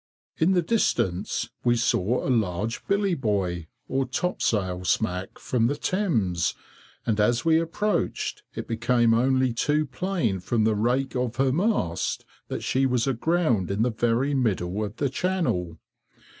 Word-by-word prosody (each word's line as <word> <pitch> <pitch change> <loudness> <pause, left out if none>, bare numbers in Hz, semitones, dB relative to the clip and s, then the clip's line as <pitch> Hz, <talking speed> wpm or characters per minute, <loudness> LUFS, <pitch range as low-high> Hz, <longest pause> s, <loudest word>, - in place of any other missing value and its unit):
In 170 +4 +4
the 175 -2 +2
distance, 95 - 0
we 120 0 +3
saw 115 -1 +1
a - - +2
large 110 -1 -1
billy 200 -1 +2
boy, 95 - -1 0.2
or 135 -1 0
topsail 105 - -1
smack, 95 -1 -1
from 115 -2 0
the 145 - 0
Thames, 115 - 0 0.5
and 110 -2 0
as 120 +5 +2
we 160 -1 +5
approached, 200 +6 -1
it - - -5
became 120 0 +2
only 130 +1 +2
too 150 +6 +1
plain 165 - -1
from 110 +5 0
the 110 0 +3
rake 125 +6 0
of 125 -2 -1
her 135 0 +2
mast, 140 - 0 0.2
that - - -4
she 135 +1 +2
was 125 -2 +1
aground 135 - +1
in 100 +3 +1
the 125 - +1
very 120 +5 +1
middle 105 -6 0
of 105 0 -5
the 145 - 0
channel. 130 - -1
120 Hz, 150 wpm, -25 LUFS, 105-145 Hz, 0.5 s, we